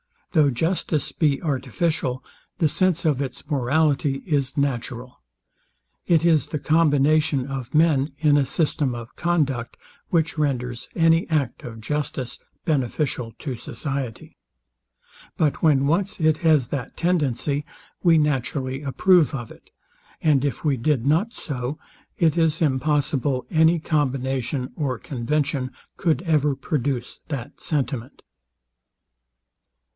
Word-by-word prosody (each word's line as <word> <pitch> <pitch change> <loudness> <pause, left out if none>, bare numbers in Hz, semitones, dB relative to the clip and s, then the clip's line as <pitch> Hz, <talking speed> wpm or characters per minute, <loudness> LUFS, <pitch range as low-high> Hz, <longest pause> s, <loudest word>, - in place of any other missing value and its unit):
Though 155 -4 +4
justice 160 +2 -1
be 150 -2 +1
artificial, 140 -1 -1 0.3
the 160 - +2
sense 185 0 +1
of 145 -4 +2
its 130 -3 -5
morality 140 0 +1
is 145 -5 0
natural. 125 - -2 0.9
It 165 -1 +3
is 160 -3 +4
the 150 - -3
combination 150 -2 +3
of 135 -1 -5
men, 150 -3 +3
in 150 -1 +3
a 140 - +3
system 145 -3 0
of 120 0 -9
conduct, 140 -9 0 0.3
which 160 -2 +1
renders 125 -5 -2
any 165 0 +3
act 145 -7 -1
of 115 -2 -8
justice 140 -1 -3 0.3
beneficial 130 -5 -1
to 135 -5 -4
society. 130 0 -5 1.0
But 150 -3 +1
when 140 -4 +4
once 180 +8 0
it 155 -1 +3
has 155 -7 +3
that 135 -4 -5
tendency, 150 -4 0 0.4
we 170 -3 +5
naturally 135 -2 -1
approve 150 +4 +3
of 120 -4 -6
it; - - -16 0.5
and 145 -4 +3
if 140 - -3
we 145 -4 +2
did 130 0 0
not 170 - +2
so, 135 0 -4 0.4
it 165 -1 +2
is 160 -1 +2
impossible 145 -2 +1
any 160 +1 +4
combination 135 -4 -1
or 135 -6 -1
convention 135 +2 -2 0.3
could 165 -4 +1
ever 150 -4 +2
produce 135 -5 -2
that 135 -6 -6
sentiment. 135 -4 -3
145 Hz, 120 wpm, -23 LUFS, 130-155 Hz, 1.0 s, we